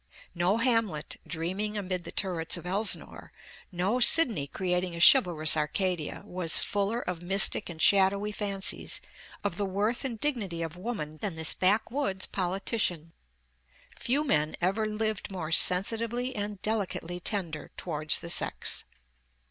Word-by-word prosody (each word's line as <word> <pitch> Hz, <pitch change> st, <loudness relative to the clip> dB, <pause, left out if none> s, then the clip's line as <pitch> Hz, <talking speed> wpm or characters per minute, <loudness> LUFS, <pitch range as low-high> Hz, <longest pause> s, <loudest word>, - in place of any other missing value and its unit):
No 175 Hz, +5 st, +1 dB
Hamlet, 230 Hz, -10 st, 0 dB
dreaming 190 Hz, +6 st, -3 dB
amid 185 Hz, -3 st, -4 dB
the -, -, -7 dB
turrets 175 Hz, -4 st, 0 dB
of 170 Hz, -, -10 dB
Elsinore, 200 Hz, +4 st, -2 dB, 0.4 s
no 190 Hz, +7 st, -1 dB
Sidney 240 Hz, -, +6 dB
creating 180 Hz, +1 st, -2 dB
a -, -, -7 dB
chivalrous 170 Hz, -, +6 dB
Arcadia, 160 Hz, +1 st, -2 dB
was 175 Hz, -2 st, +2 dB
fuller 205 Hz, +4 st, -1 dB
of 180 Hz, -5 st, -5 dB
mystic 190 Hz, +2 st, +3 dB
and 165 Hz, -2 st, -8 dB
shadowy 200 Hz, +3 st, +3 dB
fancies 200 Hz, -2 st, -1 dB, 0.4 s
of 200 Hz, -4 st, -3 dB
the 205 Hz, -, -1 dB
worth 210 Hz, +7 st, -1 dB
and 240 Hz, -5 st, -4 dB
dignity 205 Hz, -, -2 dB
of 165 Hz, 0 st, -6 dB
woman 180 Hz, -6 st, -6 dB
than 185 Hz, +2 st, -4 dB
this 160 Hz, -1 st, +2 dB
backwoods 205 Hz, +1 st, 0 dB
politician. 180 Hz, -3 st, -2 dB, 0.8 s
Few 275 Hz, +5 st, 0 dB
men 155 Hz, -, 0 dB
ever 195 Hz, +5 st, 0 dB
lived 215 Hz, -1 st, -3 dB
more 175 Hz, -5 st, -6 dB
sensitively 230 Hz, +9 st, +2 dB
and 205 Hz, -1 st, -4 dB
delicately 190 Hz, -5 st, -3 dB
tender 175 Hz, -5 st, -2 dB
towards 155 Hz, -3 st, 0 dB
the 170 Hz, -, -6 dB
sex. -, -, +1 dB
190 Hz, 135 wpm, -28 LUFS, 170-215 Hz, 0.8 s, Sidney